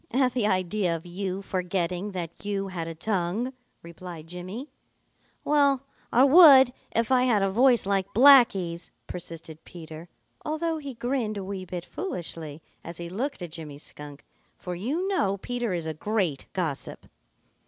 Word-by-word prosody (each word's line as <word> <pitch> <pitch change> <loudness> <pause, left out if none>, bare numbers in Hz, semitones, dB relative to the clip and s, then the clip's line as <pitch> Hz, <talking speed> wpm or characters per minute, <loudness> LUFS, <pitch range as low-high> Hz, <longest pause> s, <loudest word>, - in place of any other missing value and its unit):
"At 255 0 +2
the 240 -4 +1
idea 185 -2 0
of 165 +1 -8
you 190 +2 -4
forgetting 180 0 -2
that 170 -1 -6
you 200 -1 -2
had 170 -3 -4
a 165 - -6
tongue," 200 +7 -1 0.3
replied 170 -1 -9
Jimmy. 185 - -7 0.7
"Well, 280 -3 +3 0.3
I 245 - +5
would 275 -4 +8 0.2
if 230 +2 +1
I 255 -1 +4
had 215 -6 +3
a 195 - +1
voice 245 +2 +4
like 195 -1 0
Blacky's," 200 -10 +5 0.2
persisted 165 -2 -7
Peter, 165 0 -10 0.3
although 315 +1 -2
he 280 -4 -7
grinned 240 -3 -2
a 195 - -4
wee 190 -1 -5
bit 180 -1 -6
foolishly 165 - -6 0.2
as 170 0 -7
he 170 0 -6
looked 240 +3 -3
at 170 - -7
Jimmy 155 -4 -8
Skunk, 145 -1 -9 0.3
for 180 - -6
you 275 - -2
know 200 - +1
Peter 240 +2 -3
is 170 -3 -2
a 160 - -3
great 180 -4 -1
gossip. 165 -7 -4
190 Hz, 155 wpm, -26 LUFS, 170-245 Hz, 0.7 s, would